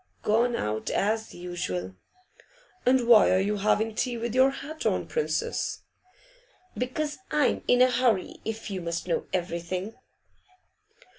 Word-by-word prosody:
'Gone 235 +3 +2
out, 110 - -2
as 220 +2 -1
usual.' 95 - -4 0.9
'And 255 -1 +4
why 225 -4 +7
are 185 - +4
you 205 +2 0
having 215 +2 +1
tea 245 +2 -1
with 230 0 -3
your 260 +1 +5
hat 290 +3 -7
on, - - +1
Princess?' 470 -1 -2 0.9
'Because 295 +4 -3
I'm 300 -4 +2
in 245 0 +6
a 255 - +4
hurry, 240 -6 +1
if 225 -1 -5
you 190 -2 -3
must 170 +1 -4
know 170 - -1
everything. 180 +3 -3
220 Hz, 135 wpm, -27 LUFS, 185-250 Hz, 0.9 s, why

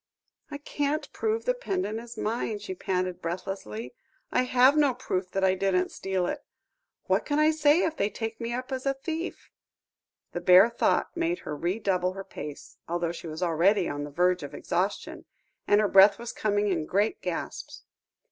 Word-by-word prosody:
"I 290 - -5
can't 290 +1 -2
prove 445 0 -1
the - - +3
pendant 370 - -2
is 235 0 -10
mine," 220 -1 -2
she 205 -2 -6
panted 185 -1 -2
breathlessly. 165 - -5 0.4
"I 255 - +2
have 255 +3 +5
no 290 -4 +3
proof 185 -7 -3
that 195 +1 -2
I 190 -1 +4
didn't 185 -1 +1
steal 190 -2 -2
it. 285 +10 -3 0.6
What - - +1
can 290 - -1
I 305 +1 +5
say 310 +2 +4
if 320 - -1
they 200 - +1
take 225 +2 -5
me 230 0 -3
up 255 +2 -4
as 260 +1 -3
a 275 - +1
thief?" 325 +5 -5 0.8
The 175 - -4
bare 185 +6 +7
thought 235 - +1
made 340 +1 0
her 150 - -3
redouble 185 +2 0
her 195 0 -6
pace, 150 -5 -9
although 170 0 -1
she 170 0 -8
was 160 +3 -4
already 180 +3 +3
on 145 0 -3
the 145 - -6
verge 180 +4 +2
of 145 - -7
exhaustion, 190 +4 -2 0.4
and 205 - +5
her 215 - +3
breath 195 +1 +7
was 235 0 -6
coming 205 -1 0
in 165 -5 -1
great 205 +3 +1
gasps. - - -5
205 Hz, 185 wpm, -27 LUFS, 180-265 Hz, 0.8 s, bare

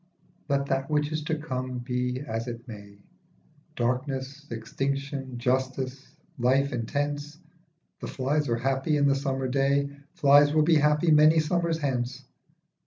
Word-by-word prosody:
LET 140 -1 +1
that 135 0 -1
which 150 0 +1
is 155 -1 -2
to 160 +1 -1
come 130 -4 -4
be 125 +1 -2
as 115 -4 -4
it 120 +1 -7
may, 100 -3 -10 0.8
Darkness, 130 +3 -2
extinction, 135 +3 -3
justice, 130 +2 -2 0.2
life 135 +3 +2
intense, 145 +5 -3 0.6
The - - -6
flies 140 +2 -1
are 115 - +1
happy 135 +5 0
in 145 - +3
the 140 - +4
summer 135 -1 -1
day, 140 +2 +1 0.2
Flies 145 +1 +5
will 155 - +5
be 160 0 +4
happy 150 +2 +3
many 155 +1 +6
summers 165 +1 0
hence. 130 -3 -2
135 Hz, 140 wpm, -27 LUFS, 125-145 Hz, 0.8 s, many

